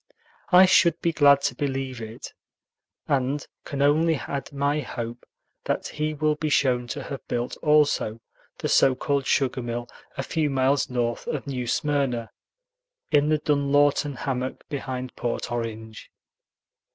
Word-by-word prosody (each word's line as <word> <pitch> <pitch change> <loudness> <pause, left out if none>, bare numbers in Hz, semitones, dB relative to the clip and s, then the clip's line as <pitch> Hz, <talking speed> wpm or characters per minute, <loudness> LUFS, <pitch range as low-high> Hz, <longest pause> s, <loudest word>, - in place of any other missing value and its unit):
I 185 +1 +9
should 170 -2 +4
be 170 - 0
glad 140 -2 +6
to - - 0
believe 135 -3 -3
it, 110 +1 -8 0.7
and 135 +1 0 0.2
can 140 0 -2
only 160 +3 +3
add 140 0 -5
my 140 +1 0
hope 120 -3 -6 0.4
that - - -2
he 155 0 -2
will 155 +1 +1
be 150 +1 -3
shown 125 -4 +2
to 140 +3 -5
have 135 +1 -7
built 120 0 -2
also 150 -7 +2 0.4
the - - -3
so 130 - +4
called 140 +1 -1
sugar 130 -2 +1
mill 120 0 -4 0.3
a - - -2
few 155 -2 0
miles 135 +1 +1
north 120 -2 -2
of 150 - -3
New 130 -3 -4
Smyrna, 135 -5 0 0.8
in 150 0 +4
the 155 - +3
Dunlawton 145 -1 +2
hammock 130 +1 -4
behind 130 -3 -5
Port 120 0 -3
Orange. 110 -2 -5
140 Hz, 145 wpm, -25 LUFS, 125-145 Hz, 0.8 s, I